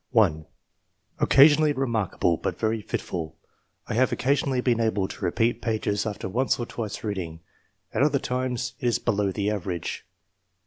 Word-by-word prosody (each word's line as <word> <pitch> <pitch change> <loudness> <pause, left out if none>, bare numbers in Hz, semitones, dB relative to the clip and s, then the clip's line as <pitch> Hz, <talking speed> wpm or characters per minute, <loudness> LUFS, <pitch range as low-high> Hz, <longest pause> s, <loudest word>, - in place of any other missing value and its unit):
1. 85 - +2 0.7
''Occasionally 145 +1 +6
remarkable, 110 -9 +1
but 90 +2 -3
very 110 0 0
fitful. 80 -5 -4 0.5
I - - -4
have 130 +3 +3
occasionally 135 -1 +1
been 125 -2 +1
able 110 -4 +1
to - - -9
repeat 115 +7 +1
pages 110 -2 -1
after 105 -3 -4
once 125 +8 +1
or 120 - -3
twice 110 -3 -5
reading; 90 -6 -4 0.5
at - - 0
other 145 0 +4
times 125 -1 -2
it 125 - -1
is 120 - +2
below 100 -1 0
the 100 +2 -1
average. 90 -4 -4
110 Hz, 150 wpm, -26 LUFS, 95-125 Hz, 0.7 s, Occasionally